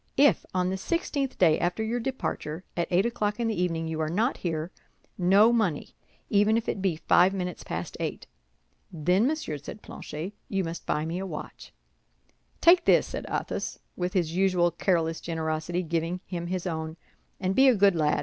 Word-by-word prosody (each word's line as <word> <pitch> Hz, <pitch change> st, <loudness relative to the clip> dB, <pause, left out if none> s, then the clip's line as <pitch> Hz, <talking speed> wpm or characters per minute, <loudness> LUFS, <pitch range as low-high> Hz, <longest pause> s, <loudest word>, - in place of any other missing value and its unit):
If, 285 Hz, +1 st, +4 dB
on 180 Hz, 0 st, 0 dB
the 190 Hz, -, -2 dB
sixteenth 280 Hz, -, -2 dB
day 160 Hz, -4 st, +4 dB
after 180 Hz, +5 st, 0 dB
your 230 Hz, +2 st, -1 dB
departure, 225 Hz, -, -3 dB
at 170 Hz, -, 0 dB
eight 185 Hz, +3 st, +3 dB
o'clock 215 Hz, -3 st, -1 dB
in 235 Hz, -, +1 dB
the 215 Hz, -5 st, -1 dB
evening 165 Hz, -2 st, -1 dB
you 160 Hz, 0 st, -3 dB
are 155 Hz, -, 0 dB
not 220 Hz, -, +1 dB
here, 165 Hz, -1 st, -3 dB, 0.4 s
no 195 Hz, +6 st, +5 dB
money—even 210 Hz, +2 st, 0 dB
if 230 Hz, -, -3 dB
it 195 Hz, -, -2 dB
be 190 Hz, -4 st, +1 dB
but 155 Hz, -, -17 dB
five 185 Hz, +2 st, +5 dB
minutes 180 Hz, -2 st, -4 dB
past 80 Hz, +1 st, -5 dB
eight." -, -, -4 dB, 0.7 s
"Then, 180 Hz, -, +2 dB
monsieur," 300 Hz, -, -2 dB
said 145 Hz, +9 st, -10 dB
Planchet, 165 Hz, +7 st, -7 dB, 0.2 s
"you 195 Hz, -1 st, 0 dB
must 165 Hz, 0 st, -6 dB
buy 150 Hz, +1 st, 0 dB
me 170 Hz, +3 st, -3 dB
a 195 Hz, -, -4 dB
watch." 155 Hz, -4 st, -8 dB, 0.9 s
"Take 345 Hz, +1 st, +6 dB
this," -, -, +5 dB
said -, -, -6 dB
Athos, -, -, -3 dB, 0.2 s
with 180 Hz, 0 st, -2 dB
his 170 Hz, -3 st, 0 dB
usual 180 Hz, -2 st, +3 dB
careless 165 Hz, -4 st, 0 dB
generosity, 160 Hz, +1 st, -2 dB
giving 170 Hz, +2 st, -2 dB
him 170 Hz, -2 st, -4 dB
his 185 Hz, 0 st, -3 dB
own, 160 Hz, -2 st, -3 dB, 0.4 s
"and 185 Hz, 0 st, 0 dB
be 265 Hz, +6 st, +6 dB
a 255 Hz, -, +6 dB
good 200 Hz, -1 st, +5 dB
lad. 150 Hz, -2 st, +2 dB
180 Hz, 185 wpm, -27 LUFS, 165-210 Hz, 0.9 s, Take